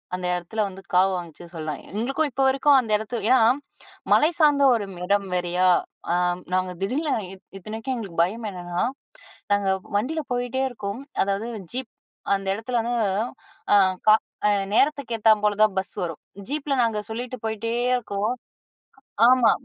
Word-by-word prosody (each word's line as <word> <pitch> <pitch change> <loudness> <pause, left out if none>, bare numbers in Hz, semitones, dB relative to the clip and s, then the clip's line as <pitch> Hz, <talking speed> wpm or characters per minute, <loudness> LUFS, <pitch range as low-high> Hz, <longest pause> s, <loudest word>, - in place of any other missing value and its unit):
அந்த 180 0 -5
எடத்துல 180 +5 -2
வந்து 195 0 -10
காவு 190 +2 +5
வாங்குச்சு 175 -1 -9
சொல்லலாம். 155 -3 -4
எங்களுக்கும் 270 +8 0
இப்போ 270 - 0
வரைக்கும் 275 +1 +4
அந்த 230 -4 -3
எடத்து 220 +3 -5
ஏன்னா, 260 - +6 0.7
மலை 305 - +5
சார்ந்த 290 -3 +5
ஒரு 205 -3 -3 0.2
இடம் 200 +1 +1
வேறையா. 180 +1 +2 0.4
ஆ - - +3 0.4
நாங்க 185 0 0
திடீர்னு 285 +8 0 0.5
இத்தனைக்கும் 220 +6 -4
எங்களுக்கு 190 -7 -2
பயம் 215 +5 -3
என்னன்னா, 175 -1 -3 0.7
நாங்க 205 -1 +1 0.3
வண்டியில 305 +9 -2
போயிட்டே 245 +2 -1
இருக்கோம். 215 0 -6 0.2
அதாவது 200 +4 -2 0.2
ஜீப் 255 -2 -4 0.4
அந்த 195 0 -1
இடத்துல 235 +3 -2
வந்து, 240 +2 -2 0.8
ஆ - - +8 0.3
க - - +8 0.4
அ - - +4 0.3
நேரத்துக்கு 275 -3 +2
ஏத்தா 220 0 +5
போல 210 -1 +2
தான் 215 -3 +2
பஸ் 190 - -3
வரும். 165 -3 -4 0.3
ஜீப்பில 285 0 -1
நாங்க 225 -2 0
சொல்லிட்டு 245 +3 -4
போயிட்டே 220 +1 -2 0.2
இருக்கோம். 210 -2 -2 0.9
ஆமா, 250 -2 +6
220 Hz, 145 wpm, -24 LUFS, 195-255 Hz, 0.9 s, ஆ